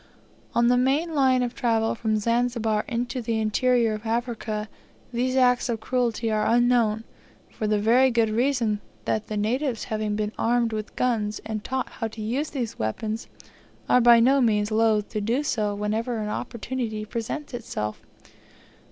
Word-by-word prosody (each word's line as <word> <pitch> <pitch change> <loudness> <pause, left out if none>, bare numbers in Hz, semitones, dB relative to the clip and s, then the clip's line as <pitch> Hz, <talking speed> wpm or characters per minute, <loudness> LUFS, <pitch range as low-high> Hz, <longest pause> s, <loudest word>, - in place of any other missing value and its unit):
On 235 0 +4
the 245 0 +4
main 290 +6 +1
line 260 -3 +3
of 245 0 -2
travel 225 -2 +1
from 220 -1 0
Zanzibar 230 -1 0
into 245 0 -2
the 225 -1 -1
interior 230 +1 +2
of 215 0 -6
Africa 225 -2 -2 0.5
these 255 +2 0
acts 250 -1 +3
of 230 -2 -1
cruelty 235 -1 -1
are 215 0 +1
unknown, 235 -2 +3 0.5
for 215 - -3
the 210 0 +2
very 240 +5 +4
good 230 -3 +2
reason 230 -3 +1 0.2
that 220 - -1
the 215 - -3
natives 240 +3 -1
having 215 -1 -2
been 210 0 -1
armed 235 -1 +1
with 215 -1 -5
guns, 215 -4 0
and 215 -1 -4
taught 265 0 -2
how 225 - -4
to 220 0 -9
use 260 +8 -1
those 245 -6 -4
weapons, 215 - -3 0.6
are 250 - +5
by 235 0 +7
no 265 +4 +4
means 210 -3 +2
loth 215 -1 +2
to 215 - -3
do 235 +7 0
so 210 -7 -1
whenever 220 +3 -2
an 210 -1 -3
opportunity 230 -1 -4
presents 235 +6 -5
itself. 105 - -4
230 Hz, 165 wpm, -25 LUFS, 215-245 Hz, 0.6 s, by